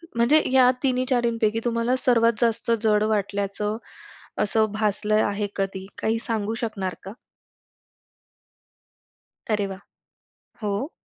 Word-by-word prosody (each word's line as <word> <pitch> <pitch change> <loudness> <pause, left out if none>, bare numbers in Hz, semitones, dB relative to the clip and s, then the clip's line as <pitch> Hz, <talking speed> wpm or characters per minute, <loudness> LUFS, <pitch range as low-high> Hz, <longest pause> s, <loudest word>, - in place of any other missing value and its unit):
म्हणजे 245 +7 +4
या 255 -1 +6
3-4 250 -3 +1
पैकी 220 +1 +2
तुम्हाला 235 +2 +1
सर्वात 230 -2 +4
जास्त 230 0 +1
जड 210 -1 +3
वाटल्याचं 205 +1 -2 0.7
असं 215 0 +2
भासलं 215 0 +1
आहे 205 0 -2
कधी, 195 -1 -3
काही 225 +1 0
सांगू 225 -1 -2
शकणार 190 -5 -3
का? 195 - -7 2.4
अरे 210 -2 +1
वाह! 190 0 -7 0.8
हो. 210 - -2
215 Hz, 110 wpm, -24 LUFS, 205-235 Hz, 2.4 s, या